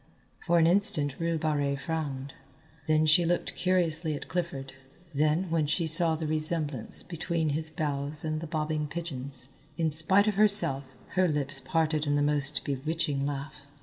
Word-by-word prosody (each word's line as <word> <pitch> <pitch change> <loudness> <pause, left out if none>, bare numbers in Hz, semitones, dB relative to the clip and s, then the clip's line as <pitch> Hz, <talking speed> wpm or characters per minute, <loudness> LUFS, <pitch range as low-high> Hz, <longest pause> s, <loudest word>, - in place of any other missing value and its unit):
For 170 -1 +1
an 165 - +5
instant 165 -6 +3
Rue 165 0 0
Barrée 145 -3 0
frowned, 140 -3 -4 0.5
then 155 0 +3
she 155 +3 +5
looked 175 +1 -1
curiously 165 -4 0
at - - -8
Clifford, 140 -7 -4 0.4
then 155 +5 +1
when 160 -3 +1
she 165 +3 0
saw 160 +1 +1
the 160 0 -4
resemblance 155 -4 -1
between 170 -2 -2
his 155 +2 -1
bows 145 -1 -2
and 155 0 -2
the 165 - -5
bobbing 155 -1 -2
pigeons, 140 -5 -6 0.3
in 160 -2 +1
spite 190 +7 +4
of 215 - +2
herself, 140 -11 +3
her 185 -1 +2
lips 145 -3 -2
parted 155 +1 0
in 145 - +2
the 145 - +2
most 145 -1 +1
bewitching 145 0 -2
laugh. 140 0 -6
155 Hz, 160 wpm, -28 LUFS, 145-165 Hz, 0.5 s, an